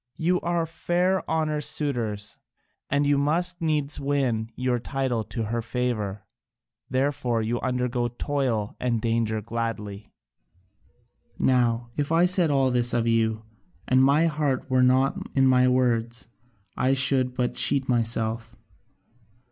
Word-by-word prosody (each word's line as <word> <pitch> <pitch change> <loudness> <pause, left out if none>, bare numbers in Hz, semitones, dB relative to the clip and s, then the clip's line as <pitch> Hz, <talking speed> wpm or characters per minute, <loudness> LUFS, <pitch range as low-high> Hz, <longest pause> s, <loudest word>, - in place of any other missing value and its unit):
You 180 +2 +1
are 170 -1 -1
fair 175 +3 0
Honour's 155 -2 -1
suitors, 110 -8 -3 0.5
and 140 +1 +1
you 145 0 +3
must 175 +5 0
needs 150 -3 0
win 130 -6 -1
your 125 -1 0
title 125 -2 -2
to 115 - -4
her 115 +2 -2
favour. 115 -4 -3 0.6
Therefore 130 -4 0
you 120 +2 -2
undergo 125 -1 -1
toil 120 -4 -2
and 120 -2 0
danger 110 -1 -1
gladly. 110 -2 -5 1.3
"Now 120 -2 +1
if 145 +1 -1
I 165 +2 +4
said 180 -2 +3
all 135 -2 +2
this 120 -1 +3
of 115 -1 +1
you, 110 -1 +1 0.4
and 130 0 +4
my 145 +4 +4
heart 150 -5 -1
were 130 0 +4
not 130 +2 +3 0.2
in 135 -1 +4
my 130 -1 +4
words, 120 -2 0 0.5
I 130 +1 +2
should 130 -2 +1
but 125 -1 -1
cheat 135 -1 +1
myself. 115 -1 0
125 Hz, 130 wpm, -25 LUFS, 115-145 Hz, 1.3 s, I